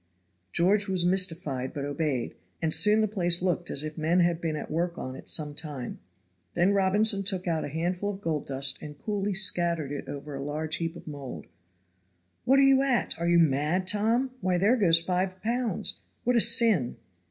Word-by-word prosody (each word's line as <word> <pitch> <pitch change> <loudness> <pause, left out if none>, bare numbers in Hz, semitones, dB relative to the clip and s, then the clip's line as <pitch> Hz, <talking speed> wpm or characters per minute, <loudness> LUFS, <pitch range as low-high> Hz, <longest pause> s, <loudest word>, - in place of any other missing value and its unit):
George 200 - +2
was 185 -2 0
mystified 165 -8 +1
but 140 -1 -3
obeyed, 145 -3 -2 0.3
and 160 -1 -1
soon 210 +7 +6
the 215 - +2
place 175 -4 0
looked 175 -1 -1
as 140 - -1
if 155 +1 -6
men 165 +3 +1
had 170 -1 +1
been 160 -2 -2
at 150 - -7
work 170 +2 -2
on 130 0 -6
it - - -10
some 150 -2 -1
time. 145 -5 -5 0.6
Then 180 +3 +2
Robinson 200 +2 +2
took 190 -2 -2
out 165 -2 -1
a - - -4
handful 175 +6 -3
of 195 -1 -6
gold 160 -6 -3
dust 135 0 +1
and 150 -1 -9
coolly 205 0 -3
scattered 170 -6 +2
it 145 - -6
over 145 +1 -7
a 135 0 -5
large 155 +2 -3
heap 165 0 -4
of - - -12
mould. 140 -4 -8 1.0
"What 270 +2 +4
are 275 - +5
you 270 -1 +5
at? 270 -3 +1
Are 170 - -1
you 175 - +4
mad, 160 +4 +1
Tom? 225 +6 +1
Why, 180 -1 0
there 205 +7 +3
goes 170 -8 +4
five 185 +2 -2
pounds. 235 -3 -1 0.2
What 245 +1 +1
a 235 - +5
sin!" 225 - +4
175 Hz, 195 wpm, -27 LUFS, 155-200 Hz, 1.0 s, soon